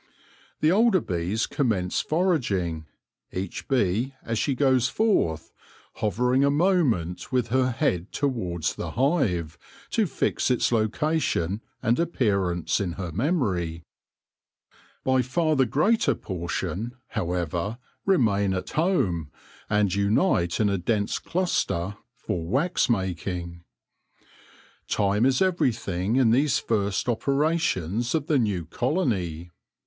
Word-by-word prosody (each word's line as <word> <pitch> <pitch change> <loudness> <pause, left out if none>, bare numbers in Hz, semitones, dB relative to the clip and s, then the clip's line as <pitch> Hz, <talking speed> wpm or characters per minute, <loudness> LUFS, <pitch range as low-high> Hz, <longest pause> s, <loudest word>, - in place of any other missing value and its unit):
The 155 - +4
older 215 0 +4
bees 90 - -1
commence 100 -10 0
foraging, 105 - 0 0.4
each 95 0 -5
bee 125 +1 +1
as 115 -1 -2
she 140 - 0
goes 130 -2 +3
forth 85 - +1 0.5
hovering 125 +6 +1
a 140 - +4
moment 140 - +1
with 125 -3 +1
her 130 +1 +2
head 115 - -1
towards 95 - -1
the - - -6
hive, 100 - 0 0.3
to 220 -4 +2
fix 140 - 0
its 125 -1 +2
location 115 - 0 0.2
and 115 +5 +2
appear 105 - +1
ance 85 -2 -1
in 95 -4 -2
her 90 -2 -5
memory. 95 - -1 1.2
By 130 -1 +3
far 155 +5 +1
the 130 -2 +3
greater 150 - +2
portion, 95 +6 -4
however, 90 +4 -2 0.3
remain 100 - +2
at 95 - -4
home 100 - 0 0.4
and 105 -3 +2
unite 100 - +2
in 105 - +3
a 100 -2 0
dense 100 +3 0
cluster 105 - -1 0.2
for 85 - -3
wax 145 - +1
making. 90 -4 -2 1.2
Time 105 +4 +2
is 135 +5 +3
everything 115 - 0
in 130 -4 +4
these 135 +2 +3
first 100 -3 -1
operations 125 - 0
of 155 -3 0
the 150 -3 +2
new 100 -8 -1
colony. 95 - -1
110 Hz, 120 wpm, -25 LUFS, 90-140 Hz, 1.2 s, The